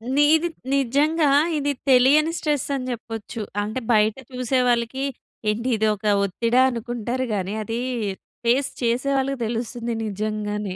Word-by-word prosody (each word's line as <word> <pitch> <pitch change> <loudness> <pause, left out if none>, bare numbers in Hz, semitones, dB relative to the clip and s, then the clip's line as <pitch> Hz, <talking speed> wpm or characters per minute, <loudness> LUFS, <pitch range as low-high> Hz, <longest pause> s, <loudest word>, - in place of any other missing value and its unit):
నీది 310 +4 +4 0.3
నిజంగా 290 +4 +2 0.3
ఇది 290 0 0 0.2
తెలియని 275 +5 +5
స్ట్రెస్ 295 -3 0
అని 255 -2 -3
చెప్పొచ్చు. 225 -1 -6 0.2
అంటే 215 +5 -3
బయట 215 0 +3 0.2
చూసేవాళ్ళకి 250 0 0 0.5
ఏంటి 230 +4 -1
ఇదొక 215 -1 0 0.2
ఒత్తిడా? 230 +6 +2
అనుకుంటారు 240 +1 -3
గాని, 190 +1 -2
అది 225 +2 -3 0.7
ఫేస్ 255 +4 +2
చేసే 245 +3 +1
వాళ్ళకి 270 0 -1
తెలుస్తుంది 235 +1 -3
నిజంగానే. 210 -1 -3
240 Hz, 115 wpm, -23 LUFS, 220-270 Hz, 0.7 s, తెలియని